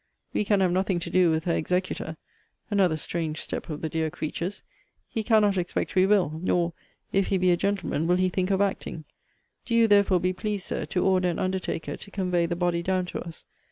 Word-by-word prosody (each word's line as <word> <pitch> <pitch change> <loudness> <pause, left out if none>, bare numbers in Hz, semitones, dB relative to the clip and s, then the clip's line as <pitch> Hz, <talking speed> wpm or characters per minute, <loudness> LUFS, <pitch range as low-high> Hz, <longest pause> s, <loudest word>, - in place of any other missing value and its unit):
We - - +1
can 200 -1 +3
have 185 -2 +3
nothing 190 0 +1
to 170 - -5
do 180 -2 +4
with 160 0 0
her 170 - +1
executor, 180 -2 -2 0.5
(another 185 -6 +3
strange 160 0 -3
step - - -5
of 150 -1 -5
the 160 - -1
dear 160 0 -1
creature's!) 170 +6 -4 0.4
He 225 - -2
cannot 210 -3 +3
expect 175 0 -2
we 185 0 +4
will 180 -7 +2
nor, 175 -2 +1 0.4
if 195 0 +2
he 195 - +1
be 185 0 +3
a - - +5
gentleman, 195 -4 -1
will 180 +1 +3
he 185 0 +2
think 185 +1 -1
of 195 0 +2
acting. 190 -5 -2 0.6
Do 230 - -1
you, 230 -1 +5
therefore, 200 -3 +4
be 185 +1 0
pleased, 205 +1 -3
Sir, - - -3
to 180 - 0
order 185 -1 +3
an 170 - -2
undertaker 185 -3 -2
to - - -10
convey 180 -4 0
the 170 - -2
body 175 -1 0
down 185 +1 0
to - - -5
us. 170 -2 -10
185 Hz, 215 wpm, -26 LUFS, 170-195 Hz, 0.6 s, a